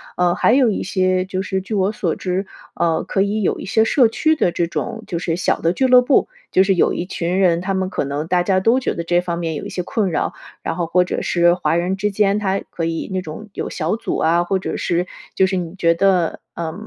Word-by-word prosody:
呃， 180 -1 +2
还 - - +3
有 260 -2 +4
一 - - -2
些 185 -1 +1
就 185 0 -3
是 190 0 -2
据 190 +4 -7
我 195 0 +1
所 180 -6 -2
知， 190 +1 -2 0.3
呃， 165 -1 +1
可 195 - -1
以 205 +2 0
有 195 - 0
一 - - -7
些 220 +3 +3
社 240 +2 +4
区 315 +8 +1
的 175 - +1
这 170 - 0
种 220 +6 -4
就 170 - -3
是 165 -1 -1
小 180 - 0
的 165 +1 +1
俱 265 - +1
乐 250 -1 +7
部， 250 +2 +2 0.2
就 190 - +4
是 195 0 +2
有 175 - +2
一 175 - -3
群 180 -1 -2
人， 175 -3 +3
他 190 +2 -2
们 190 -1 -1
可 145 - -2
能 140 +2 -3
大 180 0 +2
家 185 +1 +1
都 230 +6 +3
觉 260 - -2
得 170 - -3
这 175 +1 +2
方 175 -1 -3
面 165 -2 -2
有 - - -5
一 - - -5
些 180 - -3
困 210 -1 -1
扰， 160 - -1 0.3
然 - - -3
后 175 - 0
或 180 +2 +3
者 180 - -3
是 175 0 +3
华 175 -2 0
人 180 +3 0
之 210 +2 0
间 205 0 +1
他 195 -1 -1
可 165 - -3
以 165 0 -3
那 185 - -1
种 180 +6 -9
有 - - -4
小 170 +6 -2
组 - - -3
啊， 170 +2 +2
或 190 +2 0
者 190 - -4
是 175 +1 0 0.3
就 190 - +4
是 190 0 -1
你 175 -1 -4
觉 170 -3 +3
得， 180 -2 +1 0.2
呃， 165 -2 -4
185 Hz, 280 characters per minute, -20 LUFS, 170-195 Hz, 0.3 s, 乐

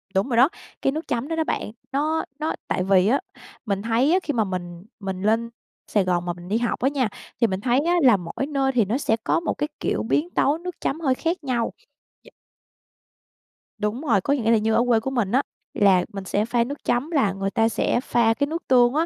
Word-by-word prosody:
đúng 195 +7 +1
rồi 235 - 0
đó, 265 +6 +6 0.3
cái 270 - +2
nước 315 +3 -5
chấm 245 +3 -2
đó 330 - -2
đó 320 - +1
bạn, 215 - -3 0.2
nó 305 +4 0 0.2
nó 310 - -1
tại 185 - 0
vì 190 0 +4
á, 265 +6 +3 0.5
mình 200 -2 -1
thấy 235 +7 +2
á, 370 - +4
khi 295 - -2
mà 225 -3 +2
mình 175 -2 -6
mình 190 -2 -4
lên 225 +3 +1 0.4
Sài 205 -3 +3
Gòn 175 -1 0
mà 175 - -1
mình 175 0 -12
đi 210 +4 +1
học 235 0 -1
á 265 - +2
nha, 260 -6 0 0.3
thì 230 - +5
mình 190 -1 -3
thấy 245 +2 +2
á, 345 - +2
là 235 -6 +6
mỗi 175 +9 -4
nơi 275 -2 +1
thì 235 -5 +2
nó 220 +6 0
sẽ 225 -5 +1
có - - +2
một 335 - -2
cái, 295 - -1
kiểu, - - -1
biến 295 +8 0
tấu 290 -3 +2
nước 360 +1 -6
chấm 310 - -1
hơi 265 -5 +2
khác 330 +2 -2
nhau. 240 -4 -1 0.5
D - - -21 1.5
Đúng 210 +4 -2
rồi, 230 -11 +2
có 280 - +1
nghĩa 230 -5 +1
là 230 - +5
như 220 +1 +1
ở 235 - +4
quê 230 -2 +4
của 265 +4 -4
mình 225 -7 0
á, 260 - +4 0.3
là 190 -3 +4
mình 195 -1 -5
sẽ 205 +3 0
pha 235 0 +1
nước 280 +5 -7
chấm, 260 +7 0
là 220 - +2
người 195 0 -3
ta 225 +1 +2
sẽ 240 - 0
pha 230 -2 +3
cái 285 +4 -1
nước 330 +3 -5
tương 245 -1 +5
á, 320 +2 +2
235 Hz, 245 wpm, -23 LUFS, 205-280 Hz, 1.5 s, đó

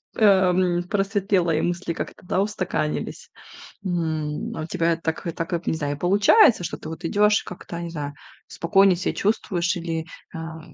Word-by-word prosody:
эм, 185 -4 +4
просветлела, 195 -3 +1
и 155 - +1
мысли 175 -1 -2
как-то, - - -7
да, 185 - +1
устаканились. 185 -7 -3 0.6
М, 160 -4 -2
а 160 - -3
у - - -4
тебя 170 0 +1
это 165 - -4
так 160 +3 -3
и 170 - 0
так 165 +2 -4
вот 170 0 -2
не - - +1
знаю, 145 -2 -2
и - - -16
получается, 205 - +5
что - - -3
ты - - -9
вот 160 +2 -8
идёшь 210 +4 +3
и - - -23
как-то, 175 -1 -8
не 170 - -5
знаю, 145 -3 -5 0.3
спокойнее 190 +2 +3
ся 185 - -1
чувствуешь 185 -4 0
или, 165 -1 -3 0.3
а, 165 0 -6
175 Hz, 185 wpm, -24 LUFS, 165-195 Hz, 0.6 s, получается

